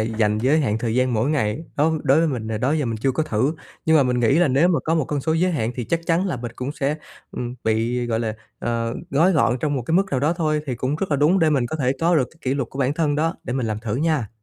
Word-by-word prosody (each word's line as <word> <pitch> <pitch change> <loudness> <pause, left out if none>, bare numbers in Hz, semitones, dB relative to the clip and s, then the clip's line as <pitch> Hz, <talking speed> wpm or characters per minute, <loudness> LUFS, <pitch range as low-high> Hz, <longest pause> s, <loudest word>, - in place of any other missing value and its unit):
dành 110 -1 0
giới 140 +7 +3
hạn 110 -6 0
thời 115 -1 -2
gian 130 -1 +1
mỗi 115 +6 +1
ngày 140 0 -1
đó, 155 +3 +3
đối 140 +1 +4
với 165 - +3
mình 115 -6 -3
là 110 -1 -2
đó 130 +6 +1
giờ 150 -5 0
mình 115 -1 -2
chưa 130 +4 0
có 160 - 0
thử. 130 +4 0 0.3
Nhưng 160 0 +5
mà 145 - +5
mình 125 -1 0
nghĩ 135 +6 +3
là 175 -4 +4
nếu 140 +7 +3
mà 170 -4 +2
có 160 - +1
một 160 - +1
con 145 +1 -2
số 160 +3 0
giới 180 +3 +1
hạn 120 -7 -1
thì 125 - -4
chắc 165 +6 -1
chắn 175 +3 +2
là 175 -9 -2
mình 120 -1 -6
cũng 130 +3 -4
sẽ, 145 +2 -1 0.3
ừm, 120 0 -5
bị, 115 +2 0
gọi 115 -1 -1
là, 110 -2 -2 0.2
ờ, 115 0 -2 0.2
gói 165 +7 +4
gọn 135 -5 +2
trong 145 +1 -1
một 130 - -2
cái 160 - -4
mức 195 - +4
nào 130 - 0
đó 150 +4 +2
thôi, 155 -3 0
thì 130 - -2
cũng 130 +5 -2
rất 190 -1 -3
là 145 - +2
đúng 150 +7 +3
để 160 -3 +3
mình 135 -5 +1
có 140 - -4
thể 130 -4 +1
có 170 +1 +3
được 130 -4 +1
cái 160 - -23
kỷ 130 -3 -1
luật 135 -4 -2
của 135 - -9
bản 135 0 +1
thân 155 -3 +1
đó. 165 +4 0
Để - - -3
mình 130 -2 -1
làm 110 -1 -2
thử 110 -1 -4
nha. 150 -5 0
135 Hz, 310 wpm, -22 LUFS, 120-155 Hz, 0.3 s, Nhưng